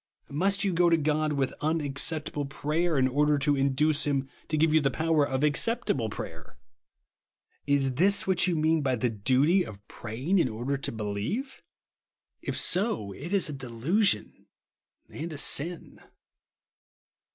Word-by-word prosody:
Must 195 +8 +1
you 195 -2 +1
go 175 0 +4
to 165 - +4
God 155 0 0
with 135 -2 -1
unac 155 -2 -1
ceptahle 150 -3 -2
prayer, 155 +3 -1
in 130 -1 +3
order 145 +3 +2
to 145 +1 +2
induce 140 +2 +2
him 140 -2 0 0.2
to 155 - -1
give 155 0 +3
you 155 - +5
the 140 - +2
power 160 +2 +1
of 135 0 -2
acceptable 150 - +1
prayer? - - -8 1.1
Is 140 -2 +2
this 190 +9 +3
what 190 -1 +3
you 175 - +1
mean 160 0 +2
by 130 -3 +1
the 120 0 -1
duty 135 - +3
of 105 - -11
praying 130 - -2
in 130 - +2
order 120 +5 -2
to 135 - -3
believe? 110 - -4 0.8
If - - -3
so, 180 - 0
it 145 - -8
is 200 -3 +3
a 150 - -4
delusion 135 - -1 0.6
and 165 +2 -6
a 155 - -6
sin. 160 +4 -2
150 Hz, 155 wpm, -28 LUFS, 130-165 Hz, 1.1 s, you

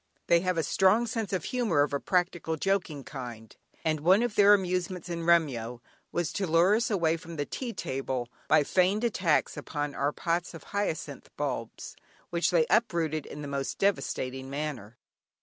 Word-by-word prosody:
They 170 - +5
have 185 0 -1
a 165 - +2
strong 190 +9 +3
sense 225 -3 -3
of 185 -5 -1
humour 220 - +1
of 145 - -3
a 140 - +1
practical 175 -2 0
joking 175 -6 -1
kind, 120 -6 -8 0.3
and 155 -1 +1
one 185 +9 +4
of 240 -3 -1
their 205 0 +7
amusements 185 -1 -2
in 170 -1 -3
Remyo 125 -9 +2 0.3
was 175 -3 -1
to 195 -2 -1
lure 170 +4 +4
us 230 - 0
away 165 -6 +2
from 165 +1 -10
the 145 -2 -2
tea 250 - -5
table 130 - -3 0.2
by 155 -1 +5
feigned 190 +8 +2
attacks 185 -9 +1
upon 145 -1 -4
our 140 +1 0
pots 170 +2 -2
of 165 - -10
hyacinth 160 -8 -3
bulbs, 130 -6 -4 0.4
which 170 0 +1
they 170 -3 +3
uprooted 165 - +1
in 150 - -8
the - - -5
most 140 -1 -3
devastating 135 -8 -1
manner. 140 -7 -5
165 Hz, 175 wpm, -29 LUFS, 145-190 Hz, 0.4 s, their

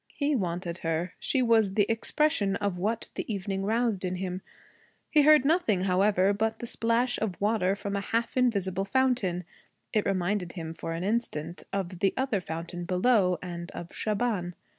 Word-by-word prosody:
He 290 0 +1
wanted 175 -4 -2
her. 165 +2 -2
She 260 - +1
was 220 -5 +3
the 205 - +4
expression 225 -2 +1
of 200 -3 -2
what 220 +5 -2
the - - -4
evening 195 -1 -2
roused 220 -1 0
in 185 0 -1
him. 185 0 -4 0.7
He 300 - +6
heard 300 -2 +6
nothing, 285 - +2
however, 195 +1 +3
but 220 +2 -1
the - - -6
splash 235 +2 +1
of 205 -5 -3
water 200 -2 +2
from 200 0 -4
a 200 - -1
half 230 +3 -1
invisible 200 -7 +1
fountain. 240 -7 +1 0.5
It 215 - +1
reminded 185 -1 -1
him 165 -3 -5
for 165 - -5
an 165 +2 -3
instant, 180 -7 -2
of 185 -2 -3
the 195 - +2
other 260 -7 0
fountain, 170 +1 -5
below, 185 0 +3
and 175 -1 -6
of 175 +1 -8
Shaban. 210 -5 -1
200 Hz, 170 wpm, -28 LUFS, 180-230 Hz, 0.7 s, He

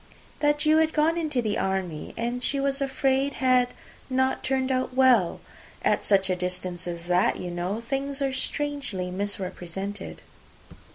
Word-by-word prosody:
"That 295 0 +2
you 310 +1 +5
were 320 0 +5
gone 315 +1 +2
into 305 -7 0
the 215 -1 0
army, 190 -5 -2
and 240 +2 -2
she 275 +2 0
was 275 0 0
afraid 270 0 +1
had 255 -1 +3 0.4
not 260 0 +1
turned 265 0 0
out 255 0 -1
well. 250 -9 +4 0.4
At - - +2
such 195 -2 +3
a 185 - +1
distance 180 0 -4
as 170 -1 -4
that, 180 +1 +2
you 180 - -5
know, 180 +5 -2
things 275 +3 -2
are 270 -1 0
strangely 260 -9 -2
misrepresented." 195 0 -4
250 Hz, 155 wpm, -26 LUFS, 185-275 Hz, 0.4 s, you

